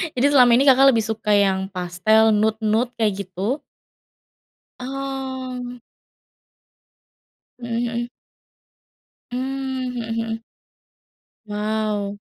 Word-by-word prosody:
Jadi 250 - +2
selama 250 -4 +6
ini 260 - +4
Kakak 270 0 +6
lebih 225 -1 +1
suka 220 -1 -2
yang 190 -1 +2
pastel, 195 +4 +2
nude-nude 220 +3 +1
kayak 200 -4 -1
gitu? 200 +10 -2 1.2
Oh. 260 -2 -5 1.8
Mhm 235 -1 -5
mhm. 240 0 -3 1.2
Mmm, 265 0 -3
mhm 230 -2 -4
mhm. 225 0 -3 1.1
Wow. 210 -1 -2
225 Hz, 90 wpm, -22 LUFS, 210-255 Hz, 1.8 s, selama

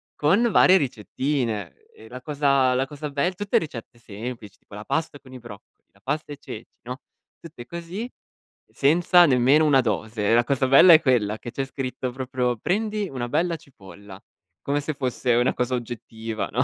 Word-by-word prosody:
con 200 +11 +2
varie 190 +1 +6
ricettine. 120 - -3 0.2
E 110 - -15
la 125 +2 -9
cosa 140 -3 +2
la 135 +1 0
cosa 150 +1 -7
be 145 +6 -1
tutte 205 +2 0
ricette 120 -6 -6
semplici, 110 -1 -8
tipo - - -21
la 105 +1 -8
pasta 160 -3 -2
con 130 -1 -16
i 130 - -9
broccoli, 115 -4 -14
la 100 - -27
pasta 150 +5 -3
e 145 - -7
ceci, 110 -4 -9 0.2
no, 125 +4 -7 0.4
tutte 155 -8 -11
così, 170 - -6 0.6
senza 175 +5 +4
nemmeno 135 +2 +4
una 135 -3 +4
dose. 110 -1 -1
La 120 +1 +4
cosa 135 0 0
bella 155 +7 +8
è 160 - +7
quella 110 -5 +1
che 120 - -9
c'è 135 - -3
scritto 130 -1 -5
proprio: 125 -1 -2
“Prendi 210 - -2
una 125 -2 -4
bella 165 +5 0
cipolla”, 100 -7 -14 0.4
come 145 +1 -1
se 150 +2 -4
fosse 130 -2 -1
una 120 +2 +2
cosa 125 +1 -1
oggettiva, 115 -2 -5
no? 125 +3 +1
130 Hz, 175 wpm, -24 LUFS, 120-150 Hz, 0.6 s, bella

